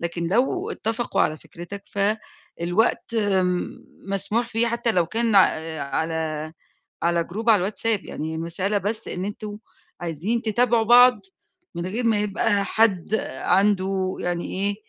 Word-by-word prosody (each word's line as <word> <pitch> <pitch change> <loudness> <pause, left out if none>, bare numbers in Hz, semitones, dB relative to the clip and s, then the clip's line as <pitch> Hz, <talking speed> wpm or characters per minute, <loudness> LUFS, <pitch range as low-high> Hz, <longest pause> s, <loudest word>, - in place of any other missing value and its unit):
لكن 170 0 -3
لو 270 - +1
اتّفقوا 225 - -2
على 155 0 0
فكرِتك 175 +6 -10
ف 200 - -10 0.6
الوقت 220 +6 +1
م 190 -4 0 0.3
مسموح 200 +4 0
فيه 230 +1 +1
حتى 235 0 0
لو 175 -2 +2
كان 225 +2 0
ع 190 - +8
أ 160 -1 -5
على 155 +1 -3 0.5
على 170 0 +2
جروب 220 +7 -1
على 215 - +6
الواتساب، 210 +2 -1
يعني 160 +1 -5
المسألة 185 +5 -1
بس 210 +3 0
إن 185 +1 -4
أنتم 210 0 -6 0.4
عايزين 175 +8 -2
تتابعوا 235 +1 +2
بعض 245 +2 +7 0.6
من 170 +1 -3
غير 225 +6 -3
ما 220 -3 +2
يبقى 205 -1 +1
حد 210 -3 +2 0.3
عنده 190 -1 +1
يعني 175 -1 -2
إيه، 200 +2 -1
200 Hz, 145 wpm, -23 LUFS, 175-225 Hz, 0.6 s, ع